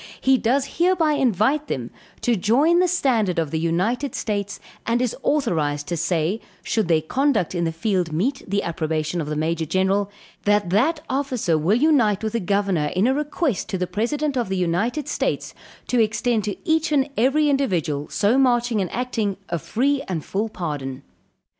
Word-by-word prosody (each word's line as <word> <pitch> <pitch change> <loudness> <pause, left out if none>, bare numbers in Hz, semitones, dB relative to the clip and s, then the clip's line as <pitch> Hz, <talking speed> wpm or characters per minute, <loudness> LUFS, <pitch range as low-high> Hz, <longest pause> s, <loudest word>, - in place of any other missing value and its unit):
He 265 0 +4
does 270 +6 0
hereby 345 -3 +3
invite 265 +3 +1
them 120 -2 -4 0.3
to 240 - +2
join 270 - +3
the 365 - +4
standard 240 - +1
of 160 -3 -1
the 160 - -1
United 190 - 0
States 205 -2 -3 0.3
and 230 +1 +2
is 250 -2 -1
authorised 155 - 0
to 175 - -1
say, 170 +4 0 0.2
should 220 -5 0
their 160 -2 +2
conduct 260 - +1
in 170 -2 0
the 165 - 0
field 175 0 -1
meet 215 - -1
the 200 +1 0
approbation 160 0 -2
of 150 - -4
the 150 - -2
Major 160 +1 -1
General, 190 +4 +1 0.4
that 205 -3 +2
that 295 - +2
officer 260 - 0
will 165 +8 +2
unite 245 -9 +3
with 220 0 -2
the 230 - +1
governor 195 -5 0
in 190 +4 +3
a 260 - +3
request 295 - -1
to 195 - -1
the 180 - -1
president 265 +10 -1
of 240 -6 -1
the 190 - -1
United 205 - 0
States, - - -2 0.3
to 245 -2 +2
extend 220 0 +1
to 205 - -3
each 320 0 +2
and 280 -2 +3
every 275 +6 +3
individual, 170 - 0
so 220 +6 +2
marching 240 -4 +2
and 185 - -3
acting, 225 -5 -2
a 170 - -1
free 270 - 0
and 170 -5 -3
full 210 +3 -2
pardon. 140 -8 -5
210 Hz, 180 wpm, -22 LUFS, 170-265 Hz, 0.4 s, He